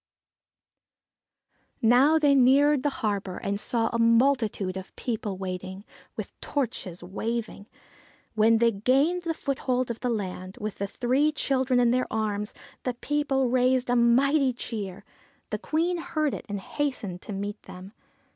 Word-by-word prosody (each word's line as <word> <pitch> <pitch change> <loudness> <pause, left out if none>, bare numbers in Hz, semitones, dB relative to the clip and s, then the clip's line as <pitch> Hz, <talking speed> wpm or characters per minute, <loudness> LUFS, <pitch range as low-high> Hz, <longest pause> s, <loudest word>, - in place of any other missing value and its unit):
Now 255 +7 +5
they 295 -3 +4
neared 275 +2 +5
the 290 - +1 0.2
harbour, 200 -3 -2
and 200 0 -2
saw 225 +1 0
a 235 - 0
multitude 230 -5 +2
of 190 0 -8
people 215 -5 -3
waiting, 190 +1 -6 0.3
with - - -6
torches 220 - -3
waving. 215 +2 -4 0.7
When 220 +1 +4
they 230 +1 +4
gained 270 - +2
the 330 -2 -2
foothold 255 -3 -1
of 230 - -6
the 250 - -1
land, 185 -3 -4
with 215 -2 -5
the 200 - -1
three 260 +8 +1
children 260 -3 +1
in 240 -1 +4
their 255 +1 +1
arms, 210 -1 -2 0.3
the 250 -2 -2
people 270 0 0
raised 255 0 +2
a - - +3
mighty 260 +3 +4
cheer. 205 -6 -6 0.5
The - - -2
Queen 340 +3 0
heard 310 -4 -1
it - - -7
and 205 0 -3
hastened 215 -7 -3
to - - -8
meet 205 +1 -4
them. 185 +3 -11
235 Hz, 145 wpm, -26 LUFS, 205-270 Hz, 0.7 s, Now